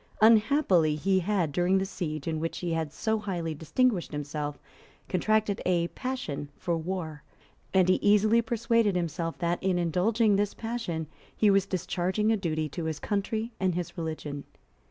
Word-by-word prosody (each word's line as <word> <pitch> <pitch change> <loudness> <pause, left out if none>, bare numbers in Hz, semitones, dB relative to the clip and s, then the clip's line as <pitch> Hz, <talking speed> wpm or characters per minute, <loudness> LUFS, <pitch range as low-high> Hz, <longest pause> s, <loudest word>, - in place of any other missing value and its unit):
Unhappily 215 - +4
he 190 +5 +2
had, 185 -4 0
during 180 +5 +2
the 190 - 0
siege 155 -6 -4
in 160 -1 -1
which 165 +1 -3
he 175 -2 -2
had 160 -2 -2
so 220 +7 -1
highly 175 -6 -3
distinguished 180 - 0
himself, 145 0 -4 0.5
contracted 215 +2 +1
a 175 -2 +1
passion 250 - -4
for 170 - -1
war; 160 -3 -4 0.5
and 185 -2 +4
he 185 - +3
easily 210 +3 +4
persuaded 230 -2 +1
himself 165 -1 -2
that, 175 -1 -1
in 190 -2 +1
indulging 195 +5 +2
this 205 0 0
passion, 225 -9 -3 0.3
he 210 -2 +5
was 195 0 +3
discharging 185 +3 0
a - - +4
duty 160 -5 -1
to 160 +3 -5
his 160 -2 -2
country 215 +3 -2
and 185 -2 +1
his 175 -1 -4
religion. 155 -4 -5
185 Hz, 160 wpm, -28 LUFS, 165-210 Hz, 0.5 s, he